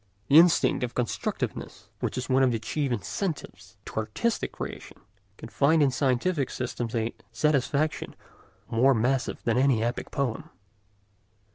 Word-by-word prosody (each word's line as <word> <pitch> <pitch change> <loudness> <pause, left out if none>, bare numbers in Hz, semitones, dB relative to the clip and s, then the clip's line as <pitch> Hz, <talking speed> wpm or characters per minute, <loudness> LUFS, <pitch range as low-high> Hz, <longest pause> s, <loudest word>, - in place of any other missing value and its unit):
The 150 - +9
instinct 170 -6 +4
of 120 - -3
constructiveness, 125 -2 -3
which - - -3
is 125 - -3
one 130 0 +3
of 130 -1 +4
the 115 - 0
chief 135 +5 -2
incentives 155 - -4
to - - -9
artistic 110 - -1
creation, - - -7 0.4
can 110 - -9
find 145 +6 +3
in 135 - +3
scientific 135 +3 0
systems 120 -2 -4
a 115 0 -1 0.2
satisfaction 150 +4 0 0.5
more 130 +4 +3
massive 125 +3 0
than 115 +1 +1
any 130 -4 +3
epic 120 +1 -3
poem. 130 -5 -2
130 Hz, 140 wpm, -27 LUFS, 120-145 Hz, 0.5 s, The